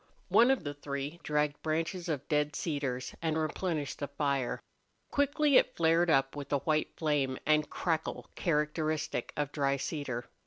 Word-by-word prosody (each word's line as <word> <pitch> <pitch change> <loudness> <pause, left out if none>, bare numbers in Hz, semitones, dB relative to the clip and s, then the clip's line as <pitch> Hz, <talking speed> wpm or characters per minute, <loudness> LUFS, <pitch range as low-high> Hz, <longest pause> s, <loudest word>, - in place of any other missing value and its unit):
One 240 +2 +6
of 270 -2 +2
the 145 - -3
three 145 +2 -5
dragged 150 -1 0
branches 165 +3 -2
of 145 -4 -2
dead 150 0 +1
cedars 135 -6 -2
and 160 -1 0
replenished 155 -1 -2
the 145 - -2
fire. 140 -3 -1 0.5
Quickly 285 0 +4
it - - +3
flared 165 +1 +3
up, 135 -2 +3
with 145 -1 -6
the 140 - +2
white 155 +2 0
flame 145 -5 +1
and 155 0 +3
crackle 160 -3 -2
characteristic 155 -4 -1
of 145 -1 -1
dry 140 -2 +1
cedar. 130 -5 -3
150 Hz, 155 wpm, -31 LUFS, 140-165 Hz, 0.5 s, One